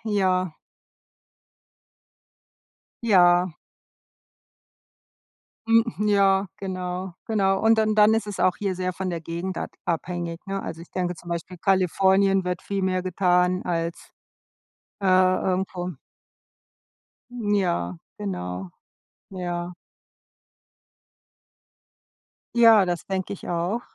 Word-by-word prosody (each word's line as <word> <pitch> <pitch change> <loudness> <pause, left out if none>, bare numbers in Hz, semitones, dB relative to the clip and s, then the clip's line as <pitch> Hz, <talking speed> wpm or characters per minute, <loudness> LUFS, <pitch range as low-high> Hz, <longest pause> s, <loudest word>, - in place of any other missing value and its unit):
Ja. 185 -4 +1 2.5
Ja. 180 -4 +5 2.2
Hm, 225 0 +5 0.2
ja, 195 -1 +3
genau, 185 -1 -4
genau, 195 -3 +1
und 225 +1 +4
dann 215 -1 +2
dann 210 +1 +6
ist 225 -1 -1
es 205 -2 -5
auch 185 - +3
hier 195 -3 -2
sehr 185 0 -2
von 190 0 -3
der 170 -1 -3
Gegend 170 +3 -4
ad - - -4
abhängig, 170 0 -3
ne? 195 0 -3
Also, 165 - -6
ich 170 - -13
denke, 180 -1 -2
zum 175 +1 -13
Beispiel 170 +1 -5
Kalifornien 190 +1 +3
wird 180 -1 -3
viel 200 -1 -3
mehr 185 -1 0
getan 180 0 +2
als, 165 -1 -3 0.9
äh, - - -6
irgendwo. 185 0 +2 1.4
Ja, 195 - 0 0.2
genau. 90 -2 -5 0.6
Ja. 175 -1 -4 2.8
Ja, 225 -4 +7
das 175 -2 -3
denke 190 -1 -3
ich 200 - -8
auch. 175 +7 -1
185 Hz, 105 wpm, -24 LUFS, 175-195 Hz, 2.8 s, Ja